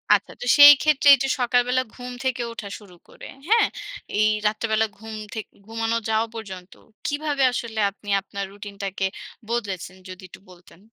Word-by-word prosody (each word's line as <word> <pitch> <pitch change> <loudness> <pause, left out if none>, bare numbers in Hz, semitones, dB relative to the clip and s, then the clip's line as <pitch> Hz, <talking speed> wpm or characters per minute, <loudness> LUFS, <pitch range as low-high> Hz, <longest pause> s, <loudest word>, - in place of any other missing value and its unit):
আচ্ছা। - - -4
তো - - -4
সেইক্ষেত্রে 290 0 +7
এইযে 270 +1 -2
সকালবেলা 245 +1 +2
ঘুম 250 0 -8
থেকে 260 -1 -1
ওঠা 210 -3 -8
শুরু 190 -4 -16
করে। - - -12 0.2
হ্যাঁ? 450 -2 +5 0.5
এই 215 - +4 0.2
রাত্রিবেলা 220 +1 0
ঘুম 220 +1 -9 0.2
থেকে 220 -2 -7 0.2
ঘুমানো 225 0 -1
যাওয়া 220 +1 +1
পর্যন্ত। 190 -5 -9 0.3
কীভাবে 290 -1 -1
আসলে 230 -2 -4
আপনি 205 +1 -13
আপনার 200 0 -6
রুটিনটাকে 200 -1 -5 0.4
বদলেছেন? 195 -6 -4
যদি 185 +1 -10
একটু 190 +1 -15
বলতেন। 175 -1 -18
220 Hz, 150 wpm, -23 LUFS, 200-250 Hz, 0.5 s, সেইক্ষেত্রে